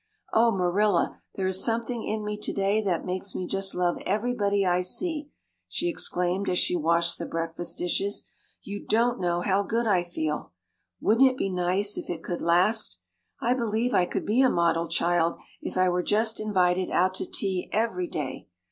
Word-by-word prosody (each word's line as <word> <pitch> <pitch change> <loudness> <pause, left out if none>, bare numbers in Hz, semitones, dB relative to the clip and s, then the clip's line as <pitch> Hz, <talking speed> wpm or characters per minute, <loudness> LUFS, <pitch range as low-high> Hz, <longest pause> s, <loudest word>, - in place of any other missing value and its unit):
"Oh, 230 +1 +5
Marilla, 195 +2 +1
there 190 - -2
is 190 0 +1
something 230 0 -1
in 215 0 -3
me 210 0 -2
today 205 0 0
that 185 -5 -1
makes 185 +1 -4
me 185 - -2
just 195 +1 -1
love 180 -1 +1
everybody 205 -1 +1
I 180 0 +2
see," 300 - -3 0.4
she 345 - -1
exclaimed 180 - 0
as 180 - +1
she 180 - +2
washed 170 +1 +2
the 170 - -4
breakfast 165 +1 -3
dishes. 195 +3 -1 0.4
"You 205 0 -6
don't 235 +2 +2
know 175 -1 0
how 195 +2 +2
good 230 +3 -1
I 195 -5 +3
feel! 155 - -4 0.5
Wouldn't 245 +5 +5
it 255 - -5
be 195 - -1
nice 185 +3 0
if - - -9
it 165 -2 -4
could 175 - -4
last? 180 - +2 0.4
I 240 - +2
believe 235 0 0
I 175 - +3
could - - -3
be 225 +5 +3
a 260 - +5
model 170 -2 +2
child 170 0 +1 0.2
if - - -5
I 185 0 +4
were 180 0 +1
just 220 +4 +1
invited 185 -4 +1
out 185 +1 +2
to - - -4
tea 190 -3 -2
every 190 -5 0
day. 140 -6 -5
190 Hz, 185 wpm, -27 LUFS, 175-215 Hz, 0.5 s, Oh